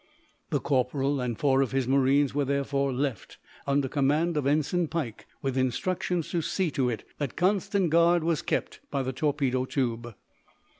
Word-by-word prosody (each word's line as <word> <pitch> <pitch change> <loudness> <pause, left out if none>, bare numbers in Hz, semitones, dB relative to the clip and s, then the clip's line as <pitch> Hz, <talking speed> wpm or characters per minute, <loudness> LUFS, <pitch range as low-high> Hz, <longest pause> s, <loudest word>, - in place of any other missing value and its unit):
The - - +1
corporal 135 +1 0
and 120 -3 -2
four 135 -2 +3
of 135 -1 -1
his 135 -2 0
marines 135 +1 +3
were 145 0 +1
therefore 140 0 0
left 130 -5 -3 0.3
under 140 -1 +2
command 150 +5 +1
of 145 -3 0
Ensign 155 +4 +1
Pike, 150 -9 -4 0.2
with 135 -2 -1
instructions 165 +6 -1
to 170 - 0
see 180 +1 -1
to 130 -4 +1
it 110 -4 -5
that 145 -4 -3
constant 190 -1 +1
guard 170 0 +4
was 165 -2 +1
kept - - -2
by 140 -2 -1
the 130 0 -3
torpedo 135 -2 0
tube. 120 -4 -2
140 Hz, 165 wpm, -27 LUFS, 130-155 Hz, 0.3 s, guard